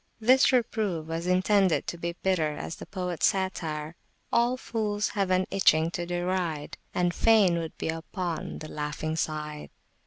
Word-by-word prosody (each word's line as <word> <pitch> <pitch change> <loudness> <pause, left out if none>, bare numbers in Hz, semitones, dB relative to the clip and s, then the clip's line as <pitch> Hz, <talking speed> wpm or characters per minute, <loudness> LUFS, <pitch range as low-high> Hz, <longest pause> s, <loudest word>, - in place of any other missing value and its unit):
This 255 +5 +5
reproof 215 -9 0
was 165 +2 -4
intended 185 0 +3
to - - -4
be 170 0 -3
bitter 160 -6 +1
as 160 - -5
the - - -9
poets 180 -3 0
satire, 165 -5 -2 0.4
All 240 +2 +3
fools 210 -4 -1
have 200 -2 0
still 185 0 +3
an - - -2
itching 165 -4 +4
to 175 -1 -4
deride, 175 -3 -2
And 175 -1 +1
fain 200 -5 +4
would 165 -1 -6
be - - -3
upon 165 +1 -4
the 155 - -7
laughing 150 +1 -3
side. 150 -1 -3
175 Hz, 160 wpm, -28 LUFS, 160-195 Hz, 0.4 s, This